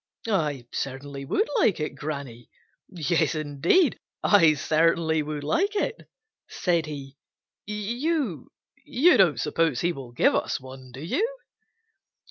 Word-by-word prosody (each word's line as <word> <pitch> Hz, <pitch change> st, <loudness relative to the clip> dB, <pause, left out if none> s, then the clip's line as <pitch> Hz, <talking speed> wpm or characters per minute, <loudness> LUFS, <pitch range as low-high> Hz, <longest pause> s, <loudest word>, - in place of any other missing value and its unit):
"I 150 Hz, -, 0 dB
certainly 140 Hz, +1 st, -5 dB
would 420 Hz, -, +1 dB
like 205 Hz, -, +3 dB
it, 150 Hz, -1 st, -3 dB
Granny. 140 Hz, -5 st, -6 dB, 0.4 s
Yes, 165 Hz, -3 st, 0 dB
indeed, 155 Hz, -, +2 dB, 0.2 s
I 165 Hz, -7 st, +6 dB
certainly 160 Hz, +1 st, +2 dB
would 150 Hz, -1 st, -5 dB
like 390 Hz, -, 0 dB
it," 455 Hz, +3 st, -2 dB, 0.4 s
said 170 Hz, -4 st, 0 dB
he. 140 Hz, -2 st, -8 dB, 0.5 s
"You—you 240 Hz, -, 0 dB
don't 160 Hz, -10 st, +4 dB
suppose 160 Hz, -2 st, 0 dB
he 175 Hz, 0 st, +1 dB
will 135 Hz, -4 st, -9 dB
give 120 Hz, -, +3 dB
us -, -, -1 dB
one, 130 Hz, -1 st, -12 dB
do 130 Hz, +3 st, -9 dB
you?" 450 Hz, -, -1 dB
155 Hz, 120 wpm, -26 LUFS, 140-205 Hz, 0.5 s, I